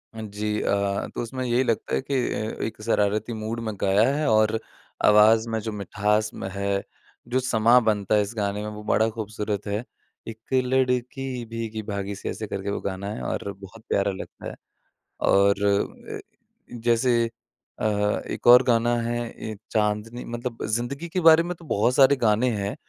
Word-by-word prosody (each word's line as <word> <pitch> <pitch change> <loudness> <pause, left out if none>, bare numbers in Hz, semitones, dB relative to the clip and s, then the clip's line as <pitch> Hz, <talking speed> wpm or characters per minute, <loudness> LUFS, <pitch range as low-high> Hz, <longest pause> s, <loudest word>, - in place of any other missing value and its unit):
जी 105 0 -3
अ, 100 0 0
तो - - -2
उसमें 130 +2 -4
यही 120 +1 +2
लगता 115 - -1
है 65 - 0
कि 140 - -3 0.2
अ, 110 +1 -4
एक 110 -1 -5
शरारती 110 +1 +1
मूड 110 +1 -4
में 110 -2 -3
गाया 100 +4 +4
है 155 0 0
और 110 0 +3 0.5
आवाज़ 110 +2 +6
में 110 0 -1
जो 110 +1 -4
मिठास 105 +2 0
म - - -6
है, 100 0 -1 0.4
जो 130 - +1
समाँ 120 -1 +4
बनता 105 -2 +1
है 105 - +4
इस 105 +3 -4
गाने 100 0 -1
में 105 - -4
वो 105 - -8
बड़ा 110 +1 +2
खूबसूरत 105 -2 -4
है। 105 +3 -2 0.4
एक 110 -1 -7 0.3
लड़की 125 0 -1
भीगी-भागी 110 -3 -4
से - - -5
ऐसे 110 - -5
करके 100 0 -4
वो 100 - -2
गाना 100 +1 -4
है - - -6
और 100 - -3
बहुत 100 +3 -12
प्यारा 100 0 +1
लगता 95 - -9
है। - - -9 0.7
और 100 +1 +5 0.6
ए - - -5 0.6
जैसे 120 0 +3 0.5
अ, - - -2 0.4
एक - - -5
और 125 +2 +9
गाना 120 -1 +2
है 120 +1 -2
ए 110 -1 -7 0.2
चांदनी 105 +2 -1
मतलब 120 0 -5
ज़िंदगी 120 +9 -3
के 185 - -1
बारे 165 0 +7
में 180 +1 -4
तो 165 -1 -16
बहुत 120 +1 +1
सारे 140 0 +6
गाने 115 0 +2
हैं। 100 +1 -3
110 Hz, 175 wpm, -25 LUFS, 105-120 Hz, 0.7 s, और